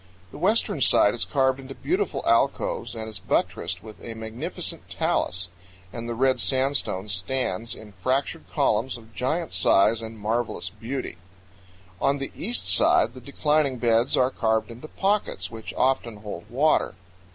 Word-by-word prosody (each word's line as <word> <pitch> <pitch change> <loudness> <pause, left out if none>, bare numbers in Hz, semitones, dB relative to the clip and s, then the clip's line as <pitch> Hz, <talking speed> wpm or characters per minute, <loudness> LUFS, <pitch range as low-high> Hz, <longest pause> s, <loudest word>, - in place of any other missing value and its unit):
The - - -10
western 190 -5 +2
side 105 -3 +5
is 120 - 0
carved 130 -1 +2
into 135 0 -9
beautiful 380 +4 -1
alcoves - - +1
and 110 -1 -4
is 110 -3 -6
buttressed 95 - -1
with 110 -1 -12
a 115 - -6
magnificent 110 +1 -5
talus, 90 0 0 0.4
and 115 0 -5
the 120 - -2
red 130 +2 +2
sandstone 130 -7 +1
stands 110 +2 -1
in 105 -1 -12
fractured 130 +9 -1
columns 115 +4 +1
of 110 -1 -16
giant 155 +8 -1
size 110 +3 +4
and 110 0 -7
marvelous 105 -4 -2
beauty. 115 -1 -5 0.8
On 140 +1 +3
the 135 -1 -5
east 240 +5 -2
side 350 +2 +4
the 130 - -11
declining 140 +1 +1
beds 115 0 +2
are 130 +1 +3
carved 110 -1 0
into 120 +6 -9
pockets, 200 - -1
which 110 -1 -7
often 125 -4 +1
hold 105 -4 -8
water. 145 +6 +2
120 Hz, 150 wpm, -25 LUFS, 110-140 Hz, 0.8 s, side